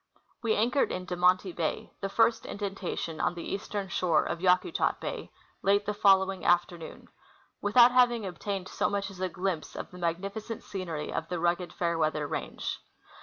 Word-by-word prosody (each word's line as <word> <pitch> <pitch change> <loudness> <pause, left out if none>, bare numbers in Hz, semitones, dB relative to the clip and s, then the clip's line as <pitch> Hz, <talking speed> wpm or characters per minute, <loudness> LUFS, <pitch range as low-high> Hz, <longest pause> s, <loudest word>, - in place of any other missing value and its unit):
We 225 -2 +1
anchored 245 +6 +2
in 185 0 -4
De 180 - -3
Monti 180 +1 +3
bay, 165 -2 -3
the 195 - -2
first 225 +2 +2
indentation 190 -5 -4
on 175 - +1
the 170 - -6
eastern 200 0 -3
shore 175 -1 +2
of 170 - -3
Yakutat 185 - +2
bay, - - -5 0.3
late 200 +1 +3
the 210 - -1
following 195 -2 +4
afternoon, 175 -1 0 0.5
without 235 +4 +6
having 245 -3 +4
obtained 190 +1 -4
so - - 0
much 200 0 -2
as 185 - -12
a 185 - 0
glimpse 180 -2 -3
of - - -6
the 180 - -11
magnifi 185 +5 -2
cent 225 0 -7
scenery 170 -6 -4
of - - -3
the 180 -1 -2
rugged 175 +1 0
Fairweather 160 -3 0
range. - - -4
185 Hz, 170 wpm, -29 LUFS, 175-205 Hz, 0.5 s, without